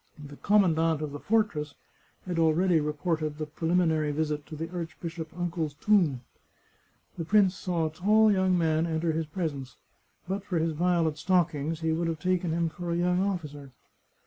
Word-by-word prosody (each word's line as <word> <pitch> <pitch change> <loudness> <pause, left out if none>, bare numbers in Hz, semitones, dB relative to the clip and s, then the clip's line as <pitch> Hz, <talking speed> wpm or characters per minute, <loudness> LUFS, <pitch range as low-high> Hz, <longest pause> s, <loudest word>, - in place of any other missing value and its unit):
The 145 -1 -11
commandant 165 -6 +2
of 150 - -4
the 145 - -6
fortress 185 -10 0 0.5
had 175 -3 -2
already 165 +2 +3
reported 150 0 -2
the 155 - -3
pre 160 +2 -4
liminary 160 -4 +2
visit 150 0 -2
to 155 - -8
the 165 +2 -4
archbishop 165 -1 -6
uncle's 165 -4 -2
tomb. 165 - +2 1.0
The - - -1
prince 195 +1 +4
saw 175 -4 -2
a 155 - -2
tall 215 +5 +4
young 190 -2 +2
man 160 -1 +1
enter 165 0 0
his 160 0 -2
presence; 145 -6 -4 0.5
but 190 +2 -3
for 190 -4 -2
his 165 0 +1
violet 165 -2 +1
stockings 165 -3 0
he 160 0 0
would 165 +1 0
have 165 -1 -3
taken 180 -1 0
him 170 +1 0
for 175 +2 -6
a 170 - 0
young 180 +1 +1
officer. 150 -8 -4
165 Hz, 170 wpm, -28 LUFS, 155-180 Hz, 1.0 s, prince